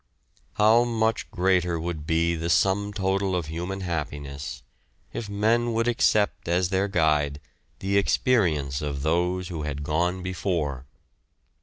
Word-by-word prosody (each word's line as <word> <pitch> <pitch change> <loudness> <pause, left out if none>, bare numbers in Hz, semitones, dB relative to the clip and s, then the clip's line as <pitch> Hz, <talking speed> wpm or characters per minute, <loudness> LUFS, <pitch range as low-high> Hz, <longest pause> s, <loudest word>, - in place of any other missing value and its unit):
How 110 +3 +5
much 115 -2 0
greater 90 -2 +1
would 80 -2 -4
be 85 +1 +2
the 85 0 -3
sum 95 +6 +2
total 95 -1 0
of 85 -3 -1
human 90 +5 -4
happiness 70 -6 -5 0.5
if 110 - -5
men 115 +4 +1
would 115 +1 +1
accept 110 -5 +2
as 90 +1 +1
their 95 +1 +1
guide 75 -6 +1 0.4
the 100 +1 +1
experience 85 - +1
of 70 -2 -3
those 90 +3 0
who 85 -4 -4
had 75 -1 -4
gone 90 +5 0
before! 85 -8 -2
90 Hz, 135 wpm, -25 LUFS, 75-100 Hz, 0.5 s, How